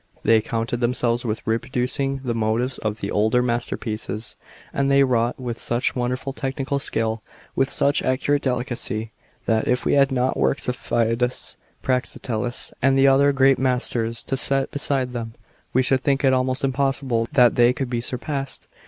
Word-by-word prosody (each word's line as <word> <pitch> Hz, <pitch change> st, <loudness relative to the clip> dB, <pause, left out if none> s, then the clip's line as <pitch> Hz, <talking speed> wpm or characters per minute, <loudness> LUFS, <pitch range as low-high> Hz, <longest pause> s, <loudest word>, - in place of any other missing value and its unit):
They 110 Hz, -1 st, +4 dB
contented 115 Hz, +2 st, -3 dB
themselves 120 Hz, -1 st, +1 dB
with 110 Hz, -1 st, -3 dB
reproducing 130 Hz, +3 st, -1 dB
the 120 Hz, -3 st, -1 dB
motives 115 Hz, +3 st, -1 dB
of 110 Hz, 0 st, -3 dB
the 100 Hz, -, -3 dB
older 110 Hz, +4 st, +2 dB
masterpieces; 115 Hz, -2 st, -3 dB, 0.4 s
and 140 Hz, 0 st, +1 dB
they 140 Hz, 0 st, +5 dB
wrought 120 Hz, -2 st, 0 dB
with 120 Hz, -2 st, -5 dB
such 120 Hz, +2 st, -1 dB
wonderful 125 Hz, +2 st, -2 dB
technical 135 Hz, +1 st, -2 dB
skill, 110 Hz, -4 st, -1 dB, 0.3 s
with 135 Hz, 0 st, +1 dB
such 140 Hz, 0 st, +2 dB
accurate 140 Hz, +2 st, 0 dB
delicacy, 120 Hz, -3 st, -2 dB, 0.3 s
that, 110 Hz, -1 st, +1 dB
if 125 Hz, 0 st, 0 dB
we -, -, +2 dB
had 140 Hz, -1 st, +4 dB
not 130 Hz, 0 st, 0 dB
works 140 Hz, -, +1 dB
of 125 Hz, -, 0 dB
Phidias, 120 Hz, +1 st, -1 dB, 0.3 s
Praxiteles, 125 Hz, -2 st, -1 dB
and 135 Hz, +1 st, +3 dB
the 135 Hz, -, +5 dB
other 140 Hz, +1 st, +5 dB
great 135 Hz, -1 st, +3 dB
masters 125 Hz, -3 st, 0 dB
to 135 Hz, -, -2 dB
set 135 Hz, 0 st, +2 dB
beside 135 Hz, -3 st, 0 dB
them, 115 Hz, -1 st, -5 dB, 0.4 s
we 130 Hz, -, +2 dB
should 130 Hz, +1 st, +2 dB
think 140 Hz, 0 st, 0 dB
it 135 Hz, -1 st, +4 dB
almost 130 Hz, +1 st, +1 dB
impossible 135 Hz, -3 st, 0 dB
that 125 Hz, -3 st, +5 dB
they 120 Hz, 0 st, +4 dB
could 130 Hz, +1 st, -3 dB
be 120 Hz, -1 st, -2 dB
surpassed. 135 Hz, +3 st, -3 dB
125 Hz, 165 wpm, -22 LUFS, 115-135 Hz, 0.4 s, they